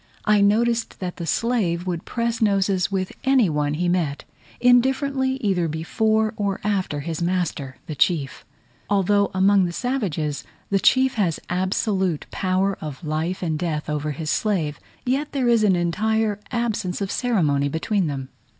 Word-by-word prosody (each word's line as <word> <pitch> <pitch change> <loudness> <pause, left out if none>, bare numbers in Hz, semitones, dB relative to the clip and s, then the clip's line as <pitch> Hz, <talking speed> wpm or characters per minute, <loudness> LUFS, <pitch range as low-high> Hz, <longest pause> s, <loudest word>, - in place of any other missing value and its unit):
I 210 -1 +4
noticed 230 +3 +2
that 180 -2 -5
the 170 - -5
slave 190 -6 0
would 175 -2 -3
press 235 -1 -2
noses 195 -3 +2
with 185 -1 -1
any 260 -9 +4
one 150 0 0
he 175 +3 0
met, 170 -5 -1 0.3
indifferently 265 +2 +3
either 185 -5 +1
before 215 +8 0
or 200 -2 -1
after 190 -8 -1
his 160 +2 -4
master 170 -7 -2
the 155 - -5
chief. 150 -1 0 0.5
Although 200 0 +3
among 195 0 +4
the 175 - -2
savages, 170 - -2 0.3
the 195 - +3
chief 260 +5 +4
has 170 -5 0
absolute 185 -2 0
power 190 +1 0
of 150 +1 -7
life 160 +5 -2
and 160 -3 -1
death 155 -3 -2
over 150 0 -2
his 155 +1 -3
slave, 165 -9 0 0.3
yet 275 +4 -1
there 265 -3 +1
is 230 -2 +4
an 195 -3 +4
entire 210 +5 0
absence 220 -6 -1
of 195 -1 -2
ceremony 150 - +1
between 180 +5 0
them. 135 -3 -4
190 Hz, 155 wpm, -23 LUFS, 160-220 Hz, 0.5 s, I